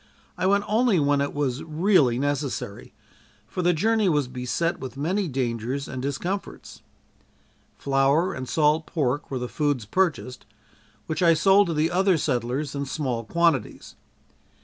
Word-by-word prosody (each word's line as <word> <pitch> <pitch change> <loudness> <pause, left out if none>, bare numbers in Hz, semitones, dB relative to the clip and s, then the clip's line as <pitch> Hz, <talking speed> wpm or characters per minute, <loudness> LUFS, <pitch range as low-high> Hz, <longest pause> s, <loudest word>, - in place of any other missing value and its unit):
I - - 0
went 200 +1 +3
only 220 -3 +2
when 145 -1 +2
it 140 - -1
was 140 -2 -2
really 160 - +2
necessary, 140 -6 -3 0.5
for 145 +11 -4
the 175 0 +3
journey 215 +4 +2
was 145 -5 +1
beset 125 +7 -2
with 130 -1 -8
many 180 +7 -1
dangers 125 0 -3
and 130 -1 -5
discomforts. 170 +9 -5 1.0
Flour 140 +7 +2
and 130 -1 -6
salt 155 0 +2
pork 145 -4 -1
were 135 - -3
the 125 0 -3
foods 145 -5 -1
purchased, 145 - -1 0.6
which 155 - -3
I 170 -2 +5
sold 195 +4 +4
to 165 - -2
the 155 +2 +1
other 190 0 +3
settlers 135 0 -2
in 140 -1 -3
small 130 -5 -2
quantities. 170 -3 0
145 Hz, 150 wpm, -24 LUFS, 130-175 Hz, 1.0 s, I